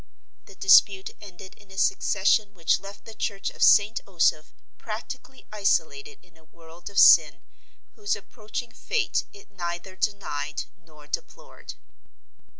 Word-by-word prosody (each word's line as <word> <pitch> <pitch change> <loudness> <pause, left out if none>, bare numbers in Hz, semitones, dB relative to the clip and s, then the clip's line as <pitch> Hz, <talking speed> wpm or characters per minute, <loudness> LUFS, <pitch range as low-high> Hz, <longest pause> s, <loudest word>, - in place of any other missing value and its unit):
The - - -16
dispute 205 - +4
ended 190 -1 -12
in 205 - -21
a 195 - -13
secession 205 +1 +1
which 165 -2 +1
left 200 +2 -12
the 225 - -11
church 200 -2 -4
of - - -14
St. 210 +2 +5
Osoph 165 -4 +1 0.3
practically 245 +4 -8
isolated 165 -9 -1
in 175 -2 -26
a 160 - -23
world 165 +2 -14
of 200 - -11
sin - - +6 0.5
whose 410 -1 -2
approaching 230 +1 -8
fate 470 - -2
it 405 - -17
neither 175 0 -6
denied 150 -8 -3
nor 155 -4 -20
deplored. 150 - -8
195 Hz, 135 wpm, -25 LUFS, 170-215 Hz, 0.5 s, sin